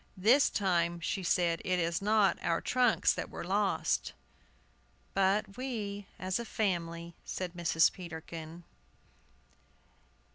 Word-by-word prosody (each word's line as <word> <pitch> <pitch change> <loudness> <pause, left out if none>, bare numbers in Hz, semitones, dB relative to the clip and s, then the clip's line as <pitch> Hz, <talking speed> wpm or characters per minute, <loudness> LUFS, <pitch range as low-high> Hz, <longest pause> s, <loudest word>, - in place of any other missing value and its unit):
"This 235 +9 +5
time," 175 -3 +1
she 180 +3 -2
said, 170 -1 +1
"it 185 -1 +1
is 170 0 0
not 210 -1 +3
our 170 -1 +1
trunks 250 -2 +3
that - - -5
were - - -6
lost" 195 +2 0 1.0
"But 195 +2 +1
we, 210 -6 -4
as 185 +3 -2
a - - -3
family," 170 -6 -2
said 180 -2 -4
Mrs. 170 -2 +3
Peterkin. 165 -1 -8
185 Hz, 115 wpm, -31 LUFS, 170-205 Hz, 1.0 s, This